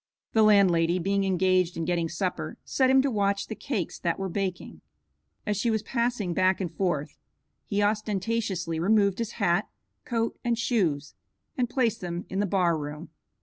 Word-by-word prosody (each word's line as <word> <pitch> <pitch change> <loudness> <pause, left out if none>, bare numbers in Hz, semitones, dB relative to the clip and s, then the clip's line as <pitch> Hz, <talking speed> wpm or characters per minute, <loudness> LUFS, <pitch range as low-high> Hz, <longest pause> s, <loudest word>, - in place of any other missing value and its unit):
The 220 - +4
landlady, 185 -5 +4
being 195 +2 0
engaged 185 -1 +2
in 165 - -2
getting 170 -1 0
supper, 180 +2 -3
set 260 -1 +2
him 265 0 +5
to 275 - 0
watch 200 -2 0
the - - -5
cakes 215 - -3
that 170 -2 -1
were 195 -1 -3
baking. 185 -1 -4 0.6
As 210 -1 -1
she 235 +4 +1
was 220 -1 0
passing 235 -6 -1
back 185 +1 +2
and 175 -4 -3
forth 150 -5 -2 0.5
he 205 0 +1
ostentatiously 205 -4 -1
removed 200 +2 +3
his 230 -2 -3
hat, 195 -3 +1 0.4
coat, 230 -1 -2
and 235 -1 +1
shoes, 180 - 0 0.4
and 245 -2 0
placed 235 -5 0
them 175 -1 -4
in 190 - -2
the 205 - +1
bar 180 -3 +2
room. 150 +3 -7
195 Hz, 170 wpm, -27 LUFS, 175-220 Hz, 0.6 s, him